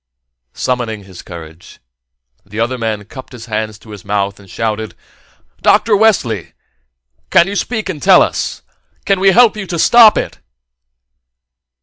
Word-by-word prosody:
Summoning 115 -5 -3
his 95 -2 -12
courage, 85 -1 -12 0.7
the 105 +2 -8
other 120 +2 -1
man 110 -3 -3
cupped 130 +4 -11
his 115 -2 -10
hands 110 -1 -4
about 110 -1 -15
his 105 -3 -10
mouth 100 0 -2
and 100 -2 -17
shouted: 110 0 -3 0.7
"Dr. 215 -2 +3
Wesley! 155 - +1 0.8
Can 170 - +5
you 200 +2 -5
speak 220 +1 -2
and 165 -6 -5
tell - - +6
us? - - -3 0.4
Can 195 -1 +1
we 195 +1 +4
help 230 +3 +5
you 205 -3 -6
stop 225 +4 +6
it?" - - -4
115 Hz, 140 wpm, -15 LUFS, -, 0.8 s, tell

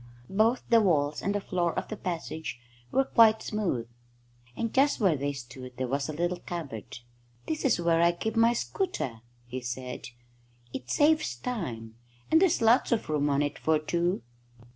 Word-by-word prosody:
Both 220 +5 +2
the 230 -1 +7
walls 150 -7 +2
and 200 +1 -1
the - - +1
floor 175 -4 -1
of - - -3
the 215 - -3
passage 160 - -4 0.3
were 270 - +3
quite 225 -4 +5
smooth, 180 - -2 0.7
and 230 -1 -2
just 280 +2 +3
where 190 -8 +3
they 140 +1 -1
stood 125 -1 -9
there 130 0 -1
was 140 +3 -1
a - - -3
little 175 +3 -1
cupboard. 140 - -6 0.5
"This 310 -2 -3
is 245 -9 +3
where 170 -1 +3
I 170 0 +5
keep 220 +6 -4
my 230 +1 +5
scooter," 240 - -3 0.2
he 125 +2 -5
said. 125 +1 -5 0.7
"It 125 - -6
saves 295 - +3
time, 120 - -5 0.3
and 320 - +6
there's 355 -10 +3
lots 230 +5 +4
of 230 -8 0
room 145 -1 +1
on 140 +1 +2
it 145 0 -3
for 160 0 +2
two." 170 -2 -1
170 Hz, 175 wpm, -28 LUFS, 135-225 Hz, 0.7 s, the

